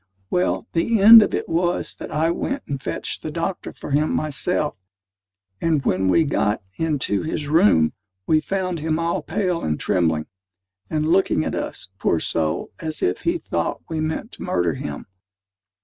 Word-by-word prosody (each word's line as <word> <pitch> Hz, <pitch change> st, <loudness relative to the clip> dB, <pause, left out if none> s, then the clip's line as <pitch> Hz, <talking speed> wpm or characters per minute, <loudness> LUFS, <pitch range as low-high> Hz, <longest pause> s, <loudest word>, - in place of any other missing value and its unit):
Well, 180 Hz, +4 st, +1 dB
the 210 Hz, +7 st, +2 dB
end 225 Hz, +3 st, +11 dB
of -, -, +1 dB
it -, -, -3 dB
was 175 Hz, +1 st, 0 dB
that -, -, -7 dB
I 160 Hz, +2 st, +1 dB
went 275 Hz, +10 st, -3 dB
and 140 Hz, -2 st, -4 dB
fetched -, -, -4 dB
the -, -, -4 dB
doctor 170 Hz, +4 st, -3 dB
for -, -, -9 dB
him 150 Hz, +2 st, +2 dB
myself, 150 Hz, +1 st, -1 dB, 0.9 s
and 155 Hz, -5 st, +1 dB
when 95 Hz, +1 st, +1 dB
we 130 Hz, -, +4 dB
got 105 Hz, -8 st, 0 dB
into 145 Hz, -10 st, 0 dB
his 155 Hz, -2 st, -3 dB
room, 150 Hz, -, +4 dB, 0.3 s
we 155 Hz, -1 st, +3 dB
found 185 Hz, 0 st, -2 dB
him 155 Hz, +1 st, -1 dB
all 165 Hz, +1 st, -1 dB
pale 180 Hz, -4 st, -1 dB
and 75 Hz, -1 st, -1 dB
trembling, 80 Hz, -3 st, +1 dB, 0.6 s
and 155 Hz, 0 st, 0 dB
looking 180 Hz, -, +2 dB
at -, -, -2 dB
us, -, -, -4 dB
poor 85 Hz, -, +1 dB
soul, 80 Hz, -1 st, -1 dB
as 155 Hz, -1 st, -4 dB
if -, -, 0 dB
he 340 Hz, +1 st, +1 dB
thought -, -, -3 dB
we 160 Hz, -1 st, -2 dB
meant 160 Hz, +8 st, -3 dB
to -, -, -12 dB
murder 85 Hz, -2 st, 0 dB
him. 75 Hz, 0 st, -6 dB
155 Hz, 170 wpm, -22 LUFS, 125-175 Hz, 0.9 s, end